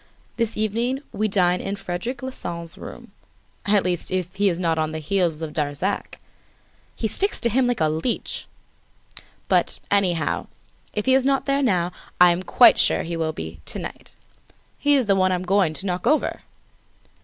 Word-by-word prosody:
This 230 -2 -1
evening 235 +6 -1
we 215 - 0
dine 180 -3 +2
in 195 - -3
Frederic 200 +7 -5
Larsan's 170 -10 -4
room, 240 -3 -10 0.6
at 205 -1 +4
least, 180 -2 -1
if 185 -1 -2
he 200 +1 +2
is 175 -1 -2
not 165 -3 +1
on 155 0 -1
the - - -3
heels 165 0 0
of 155 -2 -5
Darzac. 150 +6 -2 0.8
He 225 - -1
sticks 400 - -1
to 235 - +2
him 255 +2 +3
like 245 -1 0
a 155 - +4
leech. 160 +10 -2 1.0
But, - - +2
anyhow, 185 -5 +1 0.4
if 210 - -3
he 260 - +4
is 265 0 +4
not 270 0 +1
there 275 0 +1
now, 180 -9 +1 0.3
I 180 0 +8
am 175 +1 -1
quite 240 +6 +6
sure - - +3
he 170 0 -4
will 160 -1 -1
be, 80 - -7
to - - -3
night! - - -7 0.6
He's 285 -3 +3
the 200 -2 +3
one 185 -1 +3
I - - +2
am 180 - -3
going 185 -4 +2
to 190 - -1
knock 180 -1 -2
over!" 305 - +1
190 Hz, 180 wpm, -23 LUFS, 170-230 Hz, 1.0 s, I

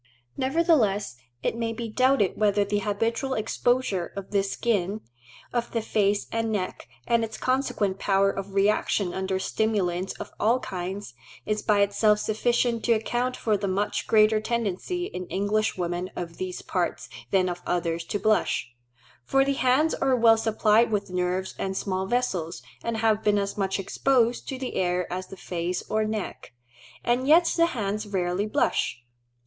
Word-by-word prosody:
Nevertheless 260 - +2 0.3
it - - 0
may 230 -1 -2
be 230 0 -5
doubted 255 -3 +2
whether 205 -1 +2
the 205 +1 0
habitual 225 +6 -1
exposure 220 -4 0
of 195 -1 -7
the 200 -1 +3
skin 200 0 -1 0.5
of 240 -1 -1
the 230 - 0
face 205 -2 +1
and 225 0 -1
neck, 190 -4 -3 0.2
and 235 -1 +2
its 220 -1 -5
consequent 235 -7 0
power 195 0 +3
of 195 0 -6
reaction 200 -2 +2
under 190 0 -1
stimulants 190 -3 -1
of - - -8
all 235 +4 +3
kinds, 190 - -5 0.3
is 215 0 -1
by 210 -2 +3
itself 205 +1 +3
sufficient 235 +2 0
to 235 - +5
account 240 +3 -1
for 215 -2 +1
the 200 0 -2
much 195 +2 -1
greater 215 0 +5
tendency 235 - -2
in 180 - -6
English 205 +2 0
women 175 +1 -2
of 170 -1 -6
these 185 -1 -5
parts 180 -2 -2 0.2
than 185 -1 +3
of 175 0 -4
others 170 -1 -1
to 205 - -2
blush; 210 - +1 0.5
for 270 - +3
the 275 - +1
hands 270 +4 +2
are 270 -1 +2
well 230 -2 +6
supplied 220 0 +3
with 200 -2 -1
nerves 180 +1 -1
and 190 0 -2
small 190 -1 -2
vessels, 195 -9 -1 0.2
and 230 -1 -2
have 220 -1 +2
been 205 -1 +3
as 200 0 -1
much 195 -1 -1
exposed 240 +4 +1
to 265 - -3
the 255 -1 -5
air 180 -1 +1
as 185 +1 -4
the 195 - -10
face 175 0 -3
or 215 0 +2
neck, 215 -10 -5 0.5
and 245 +2 +1
yet 335 +4 +7
the 335 0 +4
hands 215 -8 -3
rarely 190 0 -1
blush. 125 - 0
210 Hz, 165 wpm, -26 LUFS, 190-230 Hz, 0.5 s, yet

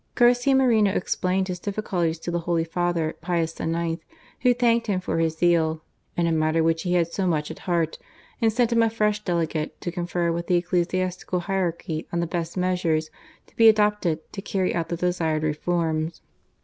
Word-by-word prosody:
Garcia 245 +3 +4
Moreno 230 -6 +4
explained 185 0 0
his 180 -2 -4
difficulties 180 -5 -1
to 175 - -5
the 175 - 0
Holy 170 -1 0
Father, 170 -1 -1
Pius 165 -2 -1
IX., 165 0 -1 0.4
who 250 - +4
thanked 235 -1 +2
him 195 -3 +1
for 180 -2 -2
his 160 -1 0
zeal 160 -2 +2 0.3
in 170 - +2
a 165 - +1
matter 160 0 +2
which 165 0 +1
he 180 - -1
had 170 -1 +1
so 190 -2 0
much 155 -3 0
at - - -9
heart," 165 -2 0 0.4
and 225 -1 +4
sent 235 +1 +1
him 230 - +4
a 225 - +3
fresh 210 -1 0
Delegate 165 -4 -2
to 175 - -4
confer 175 -1 -1
with 170 +1 -3
the 180 - +3
ecclesiastical 180 +1 -1
hierarchy 170 -4 -2
on 170 - -1
the 170 - +1
best 170 +1 -4
measures 175 -4 0 0.3
to - - -27
be 225 -1 +7
adopted 210 -7 +2
to 195 - -5
carry 190 -2 -1
out 165 -1 -2
the 170 - -2
desired 165 -3 0
reforms. 160 +1 -1
175 Hz, 190 wpm, -24 LUFS, 165-195 Hz, 0.4 s, be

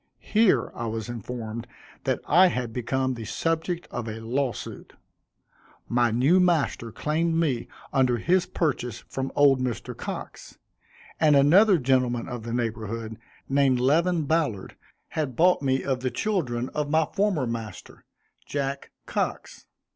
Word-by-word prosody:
Here, 210 - +2
I 120 - -4
was 110 +1 -4
informed, 115 0 -6 0.4
that - - 0
I 180 +6 +6
had 125 -8 -2
become 130 +2 -1
the 115 -2 -7
subject 165 - -2
of 120 -1 -4
a 110 0 -5
law 125 +4 -1
suit. - - -9 0.9
My 120 0 +2
new 130 +11 +3
master 160 -10 +1
claimed 160 +6 0
me 150 -8 0 0.3
under 130 -3 +3
his 180 +7 +2
purchase 125 - -2
from 135 0 -4
old 140 -2 +5
Mr. 125 -3 -3
Cox; - - -7 0.6
and 150 -2 +5
another 180 +9 +6
gentleman 125 -3 +1
of 125 -2 -5
the 115 +1 -6
neighborhood, 115 -1 -3 0.3
named 135 -2 +3
Levin 165 +6 +2
Ballard, 145 - -1 0.3
had 145 -6 -3
bought 180 +3 +4
me 130 -1 +1
of 130 -2 -1
the 130 0 -1
children 130 - -1
of 150 -1 -3
my 160 +1 +3
former 195 -6 0
master, 115 -5 -7 0.4
Jack 140 -1 -3 0.2
Cox. - - -3
130 Hz, 140 wpm, -26 LUFS, 120-160 Hz, 0.9 s, I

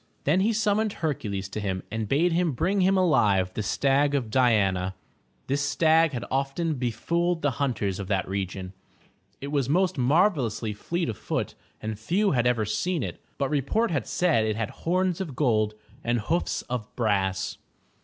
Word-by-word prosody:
Then 155 +6 +3
he 200 +4 +3
siunmoned 215 -1 +1
Hercules 105 - -3
to 105 - -4
him 95 -3 -2
and 110 -2 -3
bade 165 +6 +3
him 170 -2 +1
bring 185 +9 +1
him 190 +1 +4
alive 100 - +3
the - - -2
stag 140 +6 +2
of 120 -6 -2
Di 125 0 +4
an'a. 95 -3 +1 0.5
This 140 +1 0
stag 155 +3 +3
had 120 - -3
often 140 +5 0
befooled 165 +7 -1
the 145 - +2
himters 115 -8 -1
of 100 - -5
that 95 -2 0
region. 95 -1 -4 0.7
It 140 +1 -5
was 140 -4 0
most 180 0 +2
marvelously 130 - +2
fleet 170 - -2
of 110 - -4
foot - - -2 0.3
and 110 -1 -5
few 190 - +1
had 125 -3 +2
ever 120 -3 +2
seen 165 - -1
it. - - -6 0.2
But 140 0 -1
report 155 - +1
had 145 -8 -1
said 165 -11 +2
it 110 -1 0
had 115 -1 -3
horns 185 +1 0
of 155 -9 -5
gold, 110 -6 +1 0.3
and 120 0 +1
hoofs 165 +11 -1
of 120 -4 -4
brass. 95 -5 0
135 Hz, 175 wpm, -26 LUFS, 105-170 Hz, 0.7 s, him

